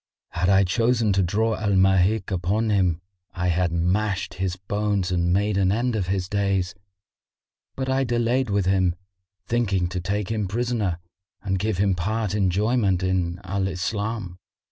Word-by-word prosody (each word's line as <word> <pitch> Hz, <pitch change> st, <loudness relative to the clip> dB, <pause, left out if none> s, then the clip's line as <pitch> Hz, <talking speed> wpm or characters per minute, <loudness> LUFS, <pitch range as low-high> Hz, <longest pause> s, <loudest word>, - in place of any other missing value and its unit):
Had 90 Hz, +1 st, 0 dB
I 100 Hz, 0 st, +5 dB
chosen 115 Hz, +3 st, +2 dB
to 95 Hz, -, +2 dB
draw 110 Hz, +5 st, +1 dB
Al 105 Hz, -2 st, 0 dB
Mahik 95 Hz, +2 st, +3 dB
upon 100 Hz, +5 st, 0 dB
him, 90 Hz, -4 st, +1 dB, 0.3 s
I 90 Hz, 0 st, 0 dB
had 85 Hz, 0 st, +1 dB
mashed 95 Hz, +3 st, 0 dB
his 90 Hz, -1 st, -2 dB
bones 100 Hz, -1 st, -1 dB
and 85 Hz, -1 st, +1 dB
made 100 Hz, +2 st, +1 dB
an 95 Hz, -1 st, +3 dB
end 120 Hz, +3 st, 0 dB
of 95 Hz, -5 st, -1 dB
his 95 Hz, -1 st, -1 dB
days: 100 Hz, -2 st, 0 dB, 1.0 s
but 130 Hz, -1 st, -3 dB
I 130 Hz, +1 st, +1 dB
delayed 120 Hz, +1 st, 0 dB
with 100 Hz, -2 st, +1 dB
him, 95 Hz, -2 st, +2 dB, 0.5 s
thinking 95 Hz, -6 st, 0 dB
to 90 Hz, 0 st, -3 dB
take 100 Hz, +3 st, -2 dB
him 105 Hz, -3 st, -1 dB
prisoner 110 Hz, -4 st, -1 dB, 0.5 s
and 95 Hz, -2 st, -1 dB
give 110 Hz, -1 st, -1 dB
him 100 Hz, 0 st, +2 dB
part 105 Hz, +3 st, -2 dB
enjoyment 100 Hz, 0 st, +1 dB
in 90 Hz, -2 st, 0 dB
Al 95 Hz, +1 st, -1 dB
Islam." 100 Hz, 0 st, -3 dB
95 Hz, 160 wpm, -24 LUFS, 90-110 Hz, 1.0 s, I